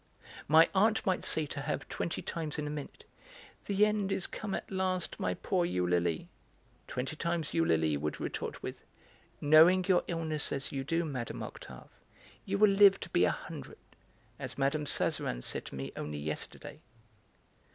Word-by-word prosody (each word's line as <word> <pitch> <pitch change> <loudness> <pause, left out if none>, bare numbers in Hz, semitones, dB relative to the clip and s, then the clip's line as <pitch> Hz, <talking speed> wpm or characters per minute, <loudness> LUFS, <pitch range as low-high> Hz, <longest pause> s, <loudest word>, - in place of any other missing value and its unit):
My 160 +2 +7
aunt 215 +3 +3
might 185 -2 +1
say 155 - +1
to 145 0 -5
her 150 +2 -1
twenty 170 - -4
times 160 -3 -4
in 150 - -2
a 145 - -3
minute: 150 -1 -7 0.6
"The 200 +1 +4
end 210 -2 0
is 190 - 0
come 205 -3 -4
at - - -6
last, 185 -2 -1
my 90 -1 0
poor 180 - 0
Eulalie!", 90 - 0 0.6
twenty 135 +5 -4
times 170 -1 -2
Eulalie 80 - +2
would 75 +1 -3
retort - - -4
with: - - -6 0.6
"Knowing 165 +5 +6
your 185 -2 +4
illness 160 -3 -2
as 135 - -2
you 135 -1 -3
do, 165 +4 0
Mme. 130 -6 -4
Octave, - - -10 0.6
you 200 +1 -1
will 210 0 +6
live 195 0 +7
to - - -6
be - - +4
a - - +3
hundred, - - -7 0.6
as - - -5
Mme. 140 +2 +1
Sazerin - - 0
said - - -2
to - - -8
me 65 0 -5
only 75 0 -4
yesterday." 75 +1 -5
155 Hz, 165 wpm, -31 LUFS, 130-185 Hz, 0.6 s, My